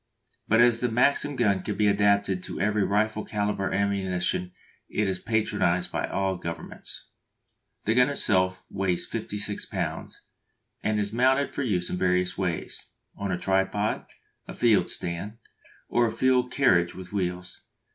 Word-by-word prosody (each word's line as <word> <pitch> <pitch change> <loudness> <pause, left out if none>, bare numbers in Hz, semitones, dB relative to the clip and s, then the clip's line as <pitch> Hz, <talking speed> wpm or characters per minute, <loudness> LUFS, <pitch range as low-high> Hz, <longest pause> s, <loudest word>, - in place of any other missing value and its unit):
But 110 +2 +4
as 120 -1 +5
the 125 - 0
Maxim 140 +5 +2
gun 100 -6 +2
can 105 +2 -4
be 105 - +2
adapted 100 -2 +2
to - - -6
every 105 +1 +1
rifle 110 +2 0
calibre 105 -2 -2
ammunition 95 -2 0 0.4
it 105 - 0
is 95 -1 -2
patronised 105 -5 0
by - - -2
all 95 -1 -1
governments. 85 -2 -8 0.7
The 110 - +2
gun 125 +3 +4
itself 95 -9 +2
weighs 95 -3 0
56 105 0 -3
lbs., - - -4 0.7
and 105 0 0
is 105 0 -2
mounted 130 +4 +2
for - - -3
use 95 -9 -1
in - - -2
various 90 0 +1
ways: 90 -3 -3 0.3
on 100 -1 -3
a 90 - 0
tripod, 95 +3 0 0.4
a - - -8
field 115 -4 +3
stand, 90 +6 -3 0.5
or 120 0 +2
a - - -2
field 125 0 +2
carriage 90 -12 +3
with 95 +1 -10
wheels. 90 -2 -3
100 Hz, 150 wpm, -26 LUFS, 95-110 Hz, 0.7 s, as